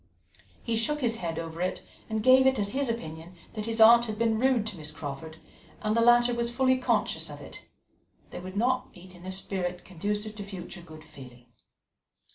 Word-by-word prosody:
He 230 - -1
shook 295 +7 0
his 230 -2 +1
head 165 -5 -4
over 165 0 -5
it, 185 0 -2 0.3
and 220 -1 -2
gave 260 +1 +7
it 265 -1 +3
as 200 -1 -1
his 270 -1 -1
opinion 165 -5 -6 0.2
that 220 - -7
as - - -6
his 225 0 -1
aunt 235 +2 +8
had 215 -2 -5
been 225 -1 +1
rude 255 -3 +2
to 215 -2 -4
Miss 150 -2 -5
Crawford, 155 +1 -7 0.5
and 215 0 +1
the 230 - +3
latter 240 +1 +5
was 235 0 -1
fully 260 +1 +2
conscious 255 - 0
of - - -9
it, - - -11 0.7
they - - -6
would 185 +2 -8
not 255 +3 0
meet 185 +1 -14
in 180 +1 -12
a - - -3
spirit 185 -2 -4
conducive 205 +4 -3
to 205 - -5
future 190 -2 -8
good 155 -2 -13
feeling. 125 -5 -14
210 Hz, 205 wpm, -28 LUFS, 175-235 Hz, 0.7 s, aunt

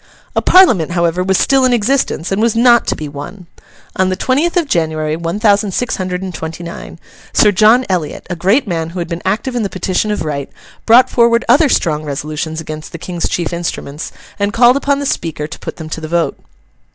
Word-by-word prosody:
A - - +2
Parliament, 220 - +4
however, 170 0 +1
was 190 0 +1
still 270 -1 +3
in 255 -1 +3
existence, 235 -6 0
and 195 +2 0
was 230 -1 +1
not 235 0 +4
to - - 0
be 155 - -6
won. 145 +6 -9 0.5
On 190 0 +2
the 185 - -1
twentieth 290 - 0
of 340 -4 +1
January, 155 - -1
one 170 +4 -4
thousand 205 -2 +2
six 245 - -1
hundred 185 0 -3
and 185 -1 -5
twenty 160 +1 -6
nine, 170 0 -9 0.4
Sir 210 - +5
John 220 +6 +4
Eliot, 175 -6 -3
a 175 - -4
great 195 - +1
man 165 -3 -2
who 175 - -9
had 170 -1 -3
been 170 0 -5
active 225 +6 -1
in 240 - 0
the 200 - -2
Petition 185 +3 -1
of 210 -6 -2
Right, 140 -2 -4 0.4
brought 240 +3 +7
forward 235 0 +3
other 300 0 +5
strong 155 -9 0
resolutions 155 +2 -4
against 155 -1 -8
the - - -5
King's 175 0 -4
chief 170 -1 -2
instruments, 165 -3 -5 0.3
and 200 0 0
called 245 +1 +5
upon 280 0 +1
the 285 - -3
Speaker 160 - -2
to 150 - -9
put - - -7
them 160 - -8
to 160 - -5
the 155 - -5
vote. 170 +1 0
185 Hz, 215 wpm, -15 LUFS, 160-235 Hz, 0.5 s, brought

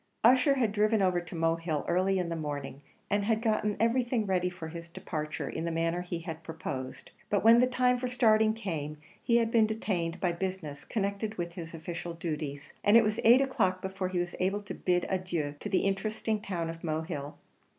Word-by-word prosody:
Ussher 255 +4 +6
had 235 -6 +1
driven 215 +1 +2
over 185 -2 +2
to 175 0 -9
Mohill 165 -2 0
early 185 +2 +2
in 180 -2 -1
the 165 - -2
morning, 145 -3 -5 0.3
and 205 0 +1
had 220 0 +2
gotten 215 -2 0
everything 240 0 +2
ready 180 -2 +1
for 175 -3 -7
his 170 +1 -8
departure 155 -2 -4
in 160 - -4
the 170 - -1
manner 165 +1 0
he 175 -1 -4
had 165 -1 -6
proposed; 145 -5 -6 0.2
but 205 - +1
when 230 +1 +8
the 250 - +5
time 250 0 +2
for 250 - -2
starting 220 -3 +3
came, 155 -9 -4 0.2
he 235 - +3
had 230 -1 +1
been 225 -2 +5
detained 185 -6 -2
by 180 - +1
business 170 -5 -4
connected 210 +1 -2
with 170 -1 -3
his 165 -1 -7
official 170 +1 -5
duties, 150 -4 -5
and 205 +3 +7
it 230 - +6
was 215 0 0
eight 240 +4 +7
o'clock 190 -9 +1
before 190 0 -3
he 185 0 -3
was 175 0 -1
able 195 +3 0
to 200 - -6
bid 180 -1 +1
adieu 175 -6 -2
to - - -5
the 185 - +2
interesting 215 +2 -1
town 175 -5 -3
of 165 0 -11
Mohill. 155 -2 -3
185 Hz, 200 wpm, -30 LUFS, 165-215 Hz, 0.3 s, when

